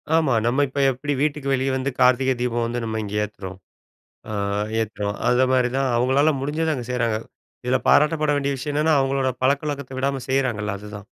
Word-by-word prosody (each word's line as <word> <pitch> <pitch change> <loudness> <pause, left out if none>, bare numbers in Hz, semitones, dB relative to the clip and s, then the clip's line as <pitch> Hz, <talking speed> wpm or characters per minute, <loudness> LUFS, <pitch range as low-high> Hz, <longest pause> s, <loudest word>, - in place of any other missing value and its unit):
ஆமா. 155 -5 +3
நம்ம 130 +4 +2
இப்போ 135 +1 -2
எப்படி 140 +3 -3
வீட்டுக்கு 145 -2 0
வெளிய 135 0 0
வந்து 130 +1 -1
கார்த்திகை 130 +1 +4
தீபம் 120 -1 0
வந்து 120 +1 -2
நம்ம 110 0 -3
இங்க 105 0 -5
ஏத்துறோம், 95 -3 -7 0.7
அ - - -4 0.5
ஏத்துறோம். 105 -2 -3
அந்த 125 +1 +4
மாதிரி 125 -1 +3
தான், 135 -1 +1
அவங்களால 135 +5 +3
முடிஞ்சத 155 +3 -1
அங்க 125 -2 -5
செய்றாங்க. 115 -3 0 0.5
இதுல 125 +1 +2
பாராட்டப்பட 150 0 +4
வேண்டிய 140 0 -1
விஷயம் 145 +3 -4
என்னென்னா 155 +1 +3
அவங்களோட 135 0 +1
பழக்கவழக்கத்த 140 0 -1
விடாம 135 0 -1
செய்றாங்கல்ல 120 -6 0
அதுதான். 105 -1 -9
130 Hz, 170 wpm, -23 LUFS, 120-140 Hz, 0.7 s, கார்த்திகை